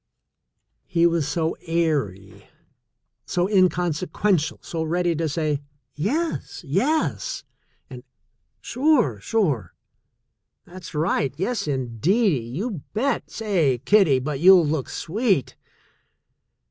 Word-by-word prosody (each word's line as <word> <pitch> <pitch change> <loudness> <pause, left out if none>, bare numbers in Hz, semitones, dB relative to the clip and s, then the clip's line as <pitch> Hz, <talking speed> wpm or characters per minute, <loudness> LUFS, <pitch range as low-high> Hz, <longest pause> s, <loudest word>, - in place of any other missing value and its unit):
He 170 -2 +2
was 165 -4 +2
so 160 +2 -1
airy, 145 - -2 0.8
so 175 0 0
inconsequential, 180 -2 +1
so 165 - -4
ready 170 +2 0
to 160 0 -1
say: 150 -1 -1 0.3
''Yes, 280 - -2
yes," 300 - 0 0.4
and - - -10 0.6
"Sure, 250 - +1
sure! 140 - -1 0.9
That's 175 -3 -11
right! 150 -4 0
Yes, 200 +1 -2
indeedy; 140 - +1
you 175 - -4
bet! 260 +4 -1
Say, 180 - 0
kiddie, 195 -10 +5
but 135 +2 -3
you'll 180 0 +7
look 150 -3 -2
sweet!" 195 - -1
170 Hz, 95 wpm, -23 LUFS, 145-200 Hz, 0.9 s, you'll